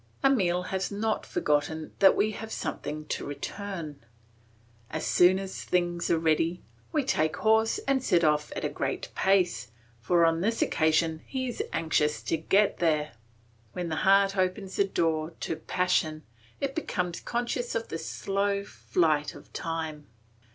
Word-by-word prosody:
Emile 180 -10 +3
has 190 +1 -2
not 215 +2 -1
forgotten 155 +1 -1
that 195 - +7
we 215 - +2
have 220 +1 -7
something 155 0 -4
to - - -3
return. 160 - -6 0.9
As - - -3
soon 180 +1 +5
as 190 0 -5
the - - -17
things 175 -1 0
are 170 - +3
ready, 165 +2 +1 0.3
we 300 -3 +1
take 155 - +1
horse 220 - +3
and 265 -2 +2
set 175 -8 +3
off 150 -1 +2
at - - -3
a - - 0
great - - -3
pace, 185 - +2 0.3
for 170 +8 +3
on 165 0 +2
this 225 +4 0
occasion 160 0 +1
he 260 -1 -2
is 245 - -3
anxious 155 -2 0
to - - 0
get 195 +6 +2
there. 155 -3 +1 0.6
When 175 -2 -3
the 155 - -2
heart 195 +2 +4
opens 185 +1 -1
the 200 - +4
door 165 -3 0
to - - -2
passion, 155 -3 0 0.4
it 275 -1 -2
becomes 180 - -2
conscious 240 0 -2
of 230 0 -2
the 165 - -4
slow 200 +2 -1
flight 155 -6 0
of - - -15
time. 160 -3 -4
175 Hz, 160 wpm, -28 LUFS, 160-200 Hz, 0.9 s, that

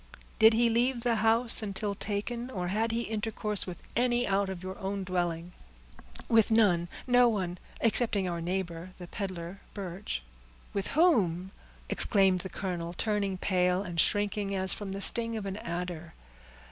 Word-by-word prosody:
"Did 220 0 +7
he 235 +1 +3
leave 240 +2 +1
the 235 -2 +1
house 225 +2 +5
until 205 0 -2
taken, 220 +5 -3
or 180 -7 -4
had 220 +4 0
he 230 +1 -1
intercourse 215 -2 -1
with 175 -2 -8
any 245 0 +1
out 195 0 +1
of 185 -2 -6
your 185 +1 -7
own 195 0 -3
dwelling?" 175 -2 -2 0.8
"With 225 -2 +4
none—no 220 +4 +3
one, 185 -5 -3 0.2
excepting 220 -4 +2
our 170 -1 -3
neighbor, 175 0 -4
the 180 - -9
peddler 185 -1 -6 0.2
Birch." 190 - -5 0.5
"With 200 -1 -2
whom!" 190 - +3 0.4
exclaimed 195 -3 +2
the 190 - -6
colonel, 175 -3 -4
turning 200 -1 -1
pale, 180 0 +1
and 175 -4 -4
shrinking 205 +1 +1
as 190 0 +5
from 205 -2 -6
the 195 - -5
sting 230 +2 +4
of 210 - -5
an 195 0 -4
adder. 170 -3 -6
195 Hz, 155 wpm, -29 LUFS, 180-225 Hz, 0.8 s, Did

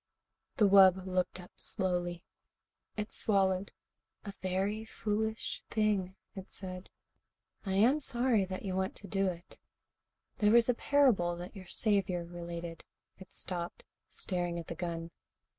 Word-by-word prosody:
The 210 - +6
wub 190 -1 +7
looked 185 0 -1
up 180 - -12
slowly. 175 -3 0 0.7
It 210 0 -4
swallowed. 195 -2 +2 0.5
"A 200 - -5
very 195 +4 -1
foolish 220 0 -2
thing," 205 -4 +1 0.2
it 190 -1 -8
said. 185 -1 -7 0.8
"I 190 - 0
am 240 +9 +5
sorry 245 -6 +2
that 185 +2 -6
you 185 -1 -2
want 190 0 -1
to 200 - -10
do 195 -1 +1
it. 175 -1 -6 0.8
There 210 0 +4
was 235 -1 +6
a 250 - +4
parable 235 -11 +3
that 175 +4 -8
your 190 -2 -10
Saviour 190 -4 +1
related 170 -1 -7 0.2
" - - -53
It 190 - -13
stopped, 175 -1 -5 0.3
staring 175 -2 -2
at 170 - -5
the - - -2
gun. 165 -1 -4
190 Hz, 140 wpm, -32 LUFS, 175-210 Hz, 0.8 s, wub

